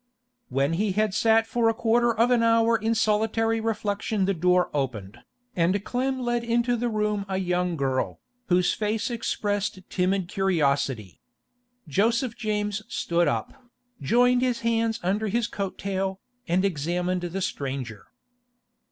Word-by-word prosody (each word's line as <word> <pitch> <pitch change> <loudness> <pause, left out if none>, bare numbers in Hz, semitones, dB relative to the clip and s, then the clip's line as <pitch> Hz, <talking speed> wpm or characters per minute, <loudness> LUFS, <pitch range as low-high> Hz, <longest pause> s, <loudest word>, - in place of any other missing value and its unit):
When 140 +4 +1
he 200 +3 0
had 215 0 +1
sat 225 +1 +3
for 230 0 +1
a 225 - 0
quarter 235 +1 +2
of 230 +2 +2
an 240 -2 +4
hour 230 0 +4
in 225 +1 0
solitary 225 +1 +1
reflection 210 -2 -1
the 195 - +1
door 180 +1 +2
opened, 120 -7 -3 0.4
and 185 +4 +1
Clem 260 +1 -1
led 240 -1 -1
into 235 +1 +1
the 240 +1 -1
room 210 -2 -1
a 190 - -1
young 180 -1 0
girl, 130 - -1 0.3
whose 180 -1 +3
face 220 +2 -1
expressed 205 -4 -2
timid 185 0 0
curiosity. 140 - 0 0.7
Joseph 230 - +1
James 210 -2 -2
stood 170 -6 0
up, 115 -2 -1 0.5
joined 245 - +3
his 250 -2 0
hands 230 0 0
under 205 +4 0
his 230 +3 0
coat 195 -2 -4
tail, 190 -1 -2 0.3
and 180 +3 +2
examined 180 +2 -1
the 175 +2 -4
stranger. 135 - -4
205 Hz, 145 wpm, -25 LUFS, 180-225 Hz, 0.7 s, an